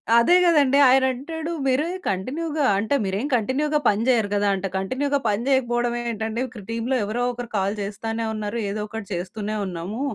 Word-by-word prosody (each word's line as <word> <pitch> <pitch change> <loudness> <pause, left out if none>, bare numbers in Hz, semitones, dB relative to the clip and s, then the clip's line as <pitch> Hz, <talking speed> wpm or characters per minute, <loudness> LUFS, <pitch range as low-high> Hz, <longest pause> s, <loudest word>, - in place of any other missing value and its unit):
అదే 235 +10 +6
కదండీ! 290 -5 +4
ఆయనంటాడు 270 +5 +1
"మీరే 265 +4 +2 0.2
కంటిన్యూగా" 295 - -2
అంటే 220 +8 0
"మీరేం 200 +8 -2
కంటిన్యూగా 280 +6 +1
పని 205 +1 +1
చేయరు 225 -5 +3
కదా!" 205 0 +1
అంట. 195 0 -3
కంటిన్యూగా 275 +9 0
పని 210 +2 +1
చేయకపోవడం 240 -2 +1 0.2
ఏంటండీ 220 +2 -3
ఇక్కడ 235 -4 -11
టీమ్‌లో 230 +3 -1
ఎవరో 215 +4 -2
ఒకరు 245 -1 -7
కాల్ 200 +1 0
చేస్తానే 225 +3 -3
ఉన్నారు. 215 +1 -3
ఏదో 210 +1 -3
ఒకటి 225 -2 -7
చేస్తూనే 205 +4 -4
ఉన్నాము. 185 +6 -5
230 Hz, 160 wpm, -23 LUFS, 205-265 Hz, 0.2 s, అదే